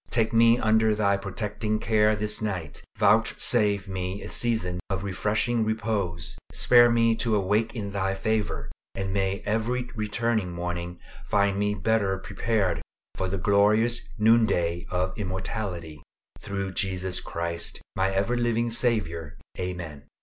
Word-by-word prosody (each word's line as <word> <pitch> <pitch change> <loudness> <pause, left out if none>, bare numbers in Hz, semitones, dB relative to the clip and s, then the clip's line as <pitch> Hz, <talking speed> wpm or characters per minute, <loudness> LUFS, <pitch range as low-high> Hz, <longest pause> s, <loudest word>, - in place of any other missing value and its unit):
Take 115 -1 +1
me 115 +1 +6
under 110 -1 +3
Thy 100 -1 +2
protecting 105 +2 -2
care 110 -1 +3
this 105 +1 0
night; 95 -9 -4
vouchsafe 100 -2 +3
me 95 +1 -4
a - - -7
season 110 -7 -1
of 95 0 -2
refreshing 110 +4 0
repose; 100 -7 -2
spare 120 -1 +6
me 115 -1 +3
to 115 -2 +1
awake 105 +4 +1
in 100 -3 -4
Thy 95 -1 -1
favor; 110 +1 -2 0.2
and 95 -1 -3
may 95 0 -1
every 120 +4 -1
returning 110 -3 -1
morning 90 0 -4 0.3
find 100 -1 +2
me 105 0 +1
better 105 -3 +1
prepared 100 0 -1 0.3
for 95 -1 -2
the 100 - -2
glorious 105 +5 +3 0.2
noon 110 +1 +5
day 85 -2 -1
of 90 +1 -1
immortality; 95 -5 -4 0.4
through 100 -1 -4
Jesus 95 -2 -2
Christ, 85 0 -3 0.2
my 95 0 +2
ever 100 +5 0
living 120 -1 0
Saviour. 85 - -1 0.2
Amen. 85 -6 -5
100 Hz, 135 wpm, -26 LUFS, 95-110 Hz, 0.4 s, me